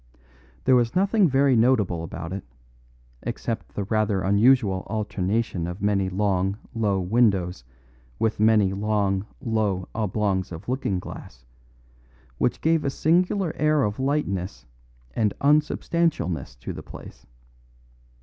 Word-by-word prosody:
There 130 Hz, -, +5 dB
was 120 Hz, -1 st, +2 dB
nothing 195 Hz, 0 st, +3 dB
very 135 Hz, 0 st, +3 dB
notable 110 Hz, -8 st, +2 dB
about 85 Hz, +1 st, -6 dB
it, 95 Hz, -, -5 dB, 0.8 s
except -, -, -4 dB
the 100 Hz, -, -1 dB
rather 105 Hz, -1 st, 0 dB
unusual 100 Hz, 0 st, +3 dB
alternation 105 Hz, -3 st, -1 dB
of 90 Hz, +2 st, -6 dB
many 100 Hz, -2 st, +1 dB
long, 95 Hz, 0 st, 0 dB, 0.2 s
low 105 Hz, -4 st, 0 dB
windows 95 Hz, -, +1 dB, 0.5 s
with 110 Hz, -1 st, 0 dB
many 105 Hz, -3 st, +4 dB
long, 100 Hz, -1 st, 0 dB
low 110 Hz, -7 st, -1 dB
oblongs 100 Hz, -3 st, -1 dB
of 80 Hz, -1 st, -8 dB
looking 125 Hz, -6 st, -1 dB
glass, -, -, -9 dB, 0.9 s
which -, -, 0 dB
gave 160 Hz, -1 st, +2 dB
a 140 Hz, -, 0 dB
singular 175 Hz, +4 st, +1 dB
air 155 Hz, -1 st, +2 dB
of 105 Hz, +1 st, -2 dB
lightness 115 Hz, -10 st, -2 dB, 0.5 s
and 105 Hz, -3 st, +1 dB
unsubstantialness 150 Hz, -, +1 dB
to -, -, -5 dB
the -, -, -7 dB
place. -, -, -12 dB
105 Hz, 120 wpm, -24 LUFS, 95-130 Hz, 0.9 s, There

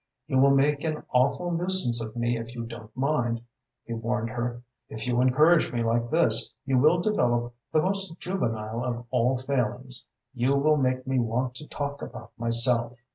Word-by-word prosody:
"You 130 Hz, -, +1 dB
will 140 Hz, +1 st, +6 dB
make 140 Hz, +1 st, +3 dB
an 155 Hz, -2 st, -2 dB
awful 140 Hz, +8 st, +2 dB
nuisance 170 Hz, -9 st, +2 dB
of 110 Hz, +1 st, -8 dB
me 120 Hz, 0 st, 0 dB
if 115 Hz, +1 st, -6 dB
you 120 Hz, -, -4 dB
don't 115 Hz, -1 st, -9 dB
mind," 130 Hz, -4 st, 0 dB, 0.5 s
he 115 Hz, -, -5 dB
warned 115 Hz, 0 st, -2 dB
her. 120 Hz, 0 st, -4 dB, 0.3 s
"If 110 Hz, -, -6 dB
you 125 Hz, 0 st, +1 dB
encourage 150 Hz, +5 st, +4 dB
me 120 Hz, -1 st, -1 dB
like 115 Hz, +1 st, 0 dB
this, 120 Hz, -8 st, +3 dB
you 135 Hz, -1 st, +2 dB
will 155 Hz, +6 st, +4 dB
develop 120 Hz, -, +1 dB, 0.2 s
the 155 Hz, -, +3 dB
most 195 Hz, -2 st, 0 dB
juvenile 115 Hz, -, -2 dB
of 120 Hz, -1 st, -3 dB
all 125 Hz, +1 st, +2 dB
failings 130 Hz, -1 st, -2 dB, 0.3 s
you 130 Hz, +2 st, +1 dB
will 150 Hz, +2 st, +3 dB
make 130 Hz, -2 st, 0 dB
me 130 Hz, -1 st, 0 dB
want 125 Hz, +2 st, -1 dB
to 150 Hz, -, -10 dB
talk 140 Hz, -1 st, -4 dB
about -, -, -9 dB
myself. 120 Hz, +1 st, +1 dB
125 Hz, 180 wpm, -26 LUFS, 120-140 Hz, 0.5 s, will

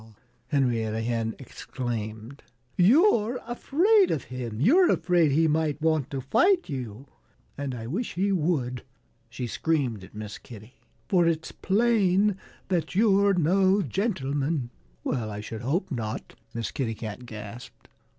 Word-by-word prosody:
Henrietta 115 Hz, -7 st, 0 dB
Hen 115 Hz, -1 st, -1 dB
exclaimed. 120 Hz, -1 st, -6 dB, 0.3 s
"You're 240 Hz, -, +4 dB
afraid 355 Hz, -, +3 dB
of 145 Hz, -, -1 dB
him! 120 Hz, -4 st, -5 dB
You're 340 Hz, -, +5 dB
afraid 175 Hz, -4 st, +3 dB
he 160 Hz, +4 st, +3 dB
might 155 Hz, -1 st, 0 dB
want 155 Hz, -3 st, +1 dB
to 135 Hz, -2 st, -4 dB
fight 360 Hz, -, +3 dB
you. 130 Hz, -, -6 dB, 0.5 s
And 140 Hz, -3 st, -4 dB
I 115 Hz, -2 st, -6 dB
wish 190 Hz, -, -3 dB
he 195 Hz, +3 st, +1 dB
would," 150 Hz, -9 st, 0 dB, 0.5 s
she 120 Hz, +2 st, -5 dB
screamed 125 Hz, -6 st, -1 dB
at 95 Hz, -, -14 dB
Miss 105 Hz, -1 st, -7 dB
Kitty, 110 Hz, +1 st, -13 dB, 0.3 s
"for 175 Hz, -3 st, +3 dB
it's 160 Hz, -1 st, -1 dB
plain 205 Hz, -2 st, +2 dB, 0.3 s
that 175 Hz, -2 st, -1 dB
you're 200 Hz, -1 st, +4 dB
no 190 Hz, +4 st, +3 dB
gentleman." 145 Hz, -, -1 dB, 0.3 s
"Well 110 Hz, -3 st, -2 dB
I 105 Hz, 0 st, -6 dB
should 110 Hz, +1 st, -6 dB
hope 165 Hz, +10 st, -1 dB
not!" 110 Hz, -5 st, -4 dB, 0.2 s
Miss 115 Hz, -2 st, -4 dB
Kitty 115 Hz, -5 st, -2 dB
Cat 110 Hz, +3 st, -7 dB
gasped. 110 Hz, +1 st, -10 dB
145 Hz, 135 wpm, -26 LUFS, 120-190 Hz, 0.5 s, You're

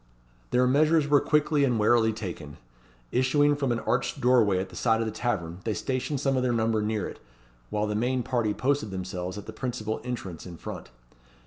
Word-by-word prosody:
Their 125 Hz, +1 st, +3 dB
measures 150 Hz, +3 st, +3 dB
were 145 Hz, -1 st, +5 dB
quickly 150 Hz, -1 st, +2 dB
and 125 Hz, -4 st, +2 dB
warily 110 Hz, +1 st, +4 dB
taken. 85 Hz, -9 st, -7 dB, 0.5 s
Issuing 145 Hz, +3 st, +3 dB
from 140 Hz, -3 st, -1 dB
an 115 Hz, -1 st, -1 dB
arched 125 Hz, +2 st, -1 dB
doorway 120 Hz, -6 st, +4 dB
at 95 Hz, +1 st, -2 dB
the 90 Hz, -, -13 dB
side 115 Hz, +4 st, +2 dB
of 115 Hz, -, 0 dB
the 110 Hz, -, -2 dB
tavern, 90 Hz, -7 st, -2 dB
they 110 Hz, -2 st, -1 dB
stationed 135 Hz, +2 st, -2 dB
some 135 Hz, 0 st, +1 dB
of 130 Hz, -, +1 dB
their 125 Hz, -1 st, +1 dB
number 110 Hz, -1 st, +1 dB
near 105 Hz, 0 st, -1 dB
it, -, -, -9 dB, 0.5 s
while 105 Hz, 0 st, 0 dB
the 105 Hz, -, -2 dB
main 125 Hz, +4 st, 0 dB
party 115 Hz, -5 st, 0 dB
posted 140 Hz, -4 st, 0 dB
themselves 90 Hz, 0 st, -5 dB
at 105 Hz, -, -7 dB
the 110 Hz, -, -8 dB
principal 110 Hz, -2 st, -3 dB
entrance 105 Hz, -9 st, -6 dB
in 85 Hz, -2 st, -9 dB
front. -, -, -8 dB
115 Hz, 200 wpm, -27 LUFS, 105-130 Hz, 0.5 s, were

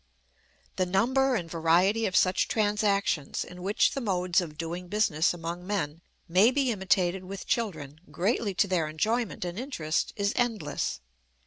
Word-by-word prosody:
The 185 Hz, -, +1 dB
number 255 Hz, +8 st, +2 dB
and 175 Hz, -7 st, -2 dB
variety 175 Hz, +7 st, +2 dB
of 185 Hz, -, -4 dB
such 185 Hz, 0 st, +3 dB
transactions 205 Hz, -7 st, 0 dB
in 180 Hz, +1 st, -11 dB
which 200 Hz, +3 st, +2 dB
the 275 Hz, -, -3 dB
modes 185 Hz, -4 st, +1 dB
of 155 Hz, -4 st, -7 dB
doing 170 Hz, +2 st, -5 dB
business 175 Hz, -5 st, +2 dB
among 175 Hz, +1 st, -6 dB
men 165 Hz, -6 st, -2 dB, 0.3 s
may 185 Hz, +7 st, +5 dB
be 260 Hz, -1 st, +1 dB
imitated 190 Hz, -2 st, +1 dB
with 195 Hz, +2 st, -7 dB
children, 155 Hz, -, -3 dB
greatly 200 Hz, +1 st, -1 dB
to 200 Hz, -, +3 dB
their 175 Hz, -4 st, 0 dB
enjoyment 215 Hz, +7 st, -1 dB
and 175 Hz, +4 st, -4 dB
interest, 170 Hz, -, -2 dB
is 200 Hz, 0 st, 0 dB
endless. 210 Hz, -, -1 dB
185 Hz, 150 wpm, -28 LUFS, 170-215 Hz, 0.3 s, may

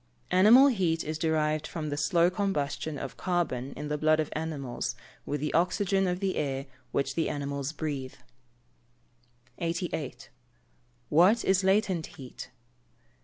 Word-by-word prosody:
_ -, -, -40 dB, 0.3 s
Animal 235 Hz, +9 st, +8 dB
heat 175 Hz, -9 st, 0 dB
is 155 Hz, +1 st, -4 dB
derived 155 Hz, -1 st, +1 dB
from 155 Hz, -2 st, -4 dB
the 145 Hz, -, -2 dB
slow 170 Hz, +4 st, +3 dB
combustion 155 Hz, -6 st, -2 dB
of 135 Hz, -, -6 dB
carbon 165 Hz, -8 st, -1 dB
in 150 Hz, +1 st, -5 dB
the 150 Hz, 0 st, -2 dB
blood 155 Hz, +1 st, +3 dB
of 155 Hz, -, -1 dB
animals 150 Hz, -6 st, -3 dB, 0.3 s
with 145 Hz, -1 st, -2 dB
the 150 Hz, -, -2 dB
oxygen 190 Hz, +3 st, +2 dB
of 180 Hz, 0 st, -1 dB
the 195 Hz, -1 st, -1 dB
air 135 Hz, -2 st, -2 dB, 0.3 s
which 140 Hz, -, 0 dB
the 165 Hz, -, 0 dB
animals 140 Hz, -1 st, -3 dB
breathe. 140 Hz, -4 st, -4 dB, 1.4 s
88. 165 Hz, -7 st, -3 dB, 0.8 s
_What 185 Hz, +9 st, +5 dB
is 190 Hz, 0 st, +3 dB
latent 190 Hz, -4 st, +2 dB
heat? 130 Hz, -4 st, -9 dB
155 Hz, 140 wpm, -29 LUFS, 145-180 Hz, 1.4 s, Animal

